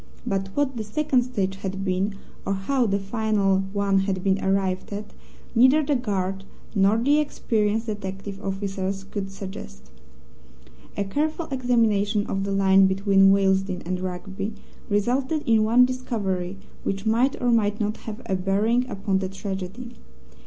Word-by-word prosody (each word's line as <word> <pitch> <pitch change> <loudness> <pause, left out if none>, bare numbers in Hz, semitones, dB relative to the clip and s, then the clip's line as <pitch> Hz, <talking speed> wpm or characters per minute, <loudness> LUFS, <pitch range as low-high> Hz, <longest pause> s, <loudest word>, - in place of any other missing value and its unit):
But 195 0 -1
what 275 -3 +1
the 220 - -2
second 260 +4 +1
stage 195 -6 -2
had 195 0 -4
been, 190 +2 0 0.3
or 195 - -1
how 245 +6 +1
the 200 -1 +1
final 200 -1 +1
one 200 -1 +2
had 190 -1 -1
been 195 0 +1
arrived 190 -1 0
at, 205 +1 -6 0.4
neither 260 +6 +5
the 290 0 +1
guard 195 -5 -2 0.3
nor 200 +1 +4
the 285 +6 +3
experienced 225 -6 0
detective 200 -1 -6
officers 195 0 -3
could 195 0 -5
suggest. 65 - -9 1.1
A 200 - +1
careful 310 - -1
examination 225 -5 +2
of 195 0 -2
the 200 - -2
line 195 -1 +5
between 195 0 +4
Willesden 190 -1 +2
and 180 +1 -2
Rugby 190 +3 -4 0.3
resulted 260 +9 +1
in 225 -2 +4
one 240 +3 +6
discovery 200 -8 -3 0.3
which 195 +1 -2
might 235 +5 +2
or 245 -1 +2
might 210 -3 +2
not 210 0 -1
have 220 +2 -8
a 190 - 0
bearing 210 +7 +1
upon 195 -3 -1
the 190 -1 -3
tragedy. 195 +4 -6
200 Hz, 150 wpm, -24 LUFS, 195-230 Hz, 1.1 s, one